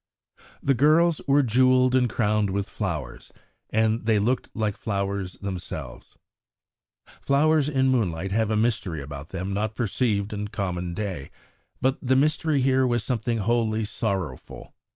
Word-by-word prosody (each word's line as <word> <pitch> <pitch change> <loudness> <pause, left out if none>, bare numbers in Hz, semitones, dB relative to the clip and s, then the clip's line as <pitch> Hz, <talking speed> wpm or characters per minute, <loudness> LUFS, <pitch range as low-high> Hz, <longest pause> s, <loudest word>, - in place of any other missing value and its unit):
The 135 - +3
girls 155 +5 +3
were 140 +1 +4
jewelled 130 +1 +4
and 125 -2 +3
crowned 105 -2 +1
with 100 +1 -2
flowers, - - -5 0.4
and 110 +1 +1
they 110 -2 +4
looked 115 +5 0
like 105 -2 -1
flowers 100 -2 -3
themselves; 95 -3 -7 1.0
flowers 150 +1 +3
in 130 -2 +2
moonlight 95 -7 0
have 110 +1 +1
a 110 - +1
mystery 105 -9 -1
about 70 +2 -8
them 95 +1 -4
not 105 +2 -2
perceived 105 -2 0
in 105 0 -3
common 90 -4 -3
day, 95 -9 -4 0.5
but 130 +1 +1
the 130 0 +2
mystery 150 +1 +2
here 130 0 +3
was 120 -2 0
something 120 -1 -1
wholly 110 0 0
sorrowful. 100 - -4
110 Hz, 140 wpm, -25 LUFS, 100-130 Hz, 1.0 s, were